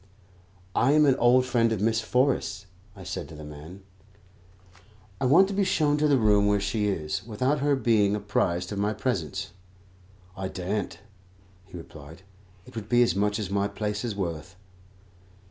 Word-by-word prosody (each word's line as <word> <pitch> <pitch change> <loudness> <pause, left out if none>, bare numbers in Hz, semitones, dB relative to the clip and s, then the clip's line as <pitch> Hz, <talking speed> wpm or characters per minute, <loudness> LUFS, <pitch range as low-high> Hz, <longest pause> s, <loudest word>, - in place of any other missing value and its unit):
"I 135 - +3
am 150 0 +5
an 135 - +5
old 125 +1 +4
friend 115 -2 +2
of 110 - -1
Miss 110 +2 +1
Forrest's," 110 -5 0 0.3
I - - -11
said - - -6
to - - -10
the 75 - -10
man; 75 +6 -11 1.4
"I - - -1
want 165 +9 +6
to - - -3
be 200 +1 +1
shown 150 -5 +1
to 150 0 +2
the 140 -2 +4
room 105 -3 +3
where 105 0 +2
she 105 +1 -1
is, 95 -1 -2
without 125 +7 -1
her 145 +1 +2
being 110 -6 +2
apprised 90 -3 -1
of 100 - -3
my 105 +1 0
presence." 95 - -3 0.8
"I 95 0 -4
daren't," 95 +3 -4 0.7
he 95 - -10
replied; 80 +1 -12 0.4
"it - - -15
would 110 -2 -7
be 120 0 +5
as 120 - 0
much 105 +1 +1
as 100 -4 -4
my 100 0 +1
place 105 +1 -4
is 115 -4 -3
worth." 85 -2 -5
105 Hz, 175 wpm, -26 LUFS, 95-120 Hz, 1.4 s, want